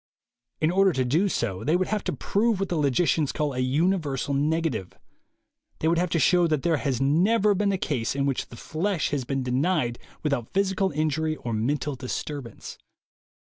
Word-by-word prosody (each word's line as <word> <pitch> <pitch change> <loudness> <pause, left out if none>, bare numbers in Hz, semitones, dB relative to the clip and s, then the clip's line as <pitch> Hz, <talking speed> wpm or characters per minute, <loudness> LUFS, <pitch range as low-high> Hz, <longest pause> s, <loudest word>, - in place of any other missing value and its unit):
In 155 +1 +3
order 190 0 +4
to 130 -2 0
do 165 +11 +2
so, 105 - -2
they 155 +7 +2
would 185 +1 0
have 210 -1 -1
to - - -1
prove 215 0 0
what 195 - -1
the 175 - -1
logicians 145 0 +2
call 150 -2 -1
a 125 - -4
universal 145 +1 0
negative. 145 - -1 0.8
They 160 - -1
would 165 +1 +3
have 180 0 0
to 170 - 0
show 175 +4 +4
that 155 -4 0
there 165 -2 +2
has 135 -4 -1
never 195 +10 +3
been 200 +1 +1
a 195 - 0
case 130 -8 -2
in 140 0 0
which 140 -2 -1
the 120 - -12
flesh 170 - -1
has 140 -4 -1
been 135 +1 -2
denied 130 -1 0 0.2
without 140 -6 -1
physical 195 0 +1
injury 155 0 -1
or 120 -6 -5
mental 140 +7 -1
disturbance. 130 -1 -6
155 Hz, 185 wpm, -26 LUFS, 135-180 Hz, 0.8 s, order